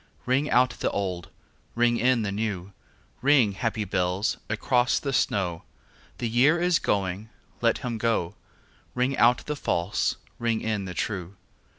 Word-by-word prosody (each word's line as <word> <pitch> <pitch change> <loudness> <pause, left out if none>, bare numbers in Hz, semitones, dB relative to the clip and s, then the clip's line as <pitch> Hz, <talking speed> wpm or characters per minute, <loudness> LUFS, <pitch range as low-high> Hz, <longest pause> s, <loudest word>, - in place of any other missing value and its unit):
Ring 135 +4 +1
out 125 +1 +4
the - - -2
old, 90 -3 -3 0.5
ring 120 0 +3
in 125 -1 +2
the 100 - -2
new, 100 -3 -3 0.5
Ring, 130 -5 +4
happy 110 +1 -2
bells, 90 +1 0
across 120 +3 +2
the 140 -1 -2
snow: 90 -9 0 0.6
The 120 - -2
year 130 +9 +4
is 175 -1 +3
going, 100 +2 -1 0.3
let 115 -1 +3
him 120 -3 -4
go; 110 -6 0 0.6
Ring 125 +2 +1
out 120 0 +4
the 150 - -2
false, 85 -9 0 0.2
ring 115 -1 0
in 105 -3 -2
the 90 -1 -6
true. 95 -2 -3
110 Hz, 150 wpm, -26 LUFS, 100-125 Hz, 0.6 s, out